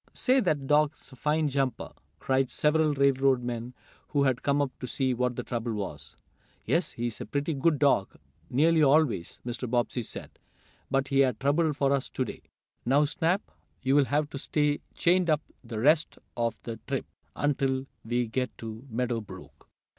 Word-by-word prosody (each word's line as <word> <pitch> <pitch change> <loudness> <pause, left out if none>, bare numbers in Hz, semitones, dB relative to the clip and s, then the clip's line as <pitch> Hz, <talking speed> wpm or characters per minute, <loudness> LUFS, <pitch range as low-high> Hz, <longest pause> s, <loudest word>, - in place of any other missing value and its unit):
"Say, 260 +1 +3
that 155 - 0
dog's 150 +1 +1
a - - -12
fine 150 +4 +1
jumper!" 135 -3 -1 0.3
cried 130 -1 +1
several 155 0 +2
railroad 135 -2 +3
men 120 +1 -4 0.3
who 140 -1 +1
had 130 -3 +1
come 140 0 +1
up 140 -2 0
to 125 - -5
see 130 0 0
what 125 0 0
the 125 - -3
trouble 120 -1 -3
was. 75 -9 -6 0.5
"Yes, 160 +7 +1
he 120 - -3
is 120 -2 -4
a - - -4
pretty 145 +3 -1
good 150 +2 +2
dog, 140 -9 +2 0.3
nearly 160 +5 +4
always," 140 - +3
Mr. 120 0 -4
Bobbsey 120 +1 0
said, 115 - -9 0.5
"but 135 +1 0
he 140 0 +4
made 130 -5 +2
trouble 150 +4 +2
for 140 -1 +1
us 135 -2 -1
to 130 - -2
day. - - -8 0.4
Now, 140 +4 +4
Snap, 165 +6 0 0.4
you'll 135 +2 +4
have 145 +2 +1
to 140 - -5
stay 150 0 +1 0.2
chained 175 0 +3
up 155 -1 +3 0.2
the 115 -2 -6
rest 150 +6 +3 0.2
of 115 -1 0
the 115 -1 -5
trip, - - -2 0.3
until 135 -2 0 0.2
we 120 +2 0
get 125 +3 -3
to 115 +3 -8
Meadow 120 0 -1
Brook." 105 - -13
135 Hz, 175 wpm, -28 LUFS, 120-150 Hz, 0.5 s, nearly